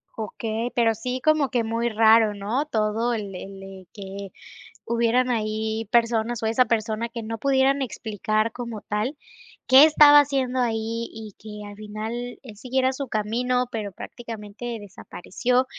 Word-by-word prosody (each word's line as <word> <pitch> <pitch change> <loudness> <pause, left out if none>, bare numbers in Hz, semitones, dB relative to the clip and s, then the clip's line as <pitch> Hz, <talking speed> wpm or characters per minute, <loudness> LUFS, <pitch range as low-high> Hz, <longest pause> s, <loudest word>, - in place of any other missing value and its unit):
Okey, 225 +2 -3
pero 230 -2 +3
sí 250 +3 -4
como 310 -4 +3
que 240 -2 0
muy 230 +1 -1
raro, 220 -1 +5
¿no?, 215 +9 -1
todo 225 0 0
el 205 -3 -5
el 195 0 -10
que 195 -1 -8 0.5
hubieran 235 +2 +2
ahí 220 -1 -2
personas, 230 -1 +1
o - - 0
esa 230 +3 +3
persona 225 0 -1
que 230 -1 -6
no 225 +1 -5
pudieran 275 +2 +2
explicar 215 -2 -1
como 235 -3 -6
tal, 215 +8 -2 0.5
qué 265 +3 +9
estaba 295 -1 +8
haciendo 265 -3 -1
ahí, 230 -1 -1
y 220 -2 -9
que 210 -1 -9
al 205 - -10
final 215 +1 -5 0.3
él 220 -6 -11
siguiera 260 +3 0
su 275 +1 -5
camino, 245 +3 0
pero 210 -3 -4
prácticamente 230 +3 -7
desapareció, 210 +5 -2
225 Hz, 150 wpm, -24 LUFS, 215-250 Hz, 0.5 s, qué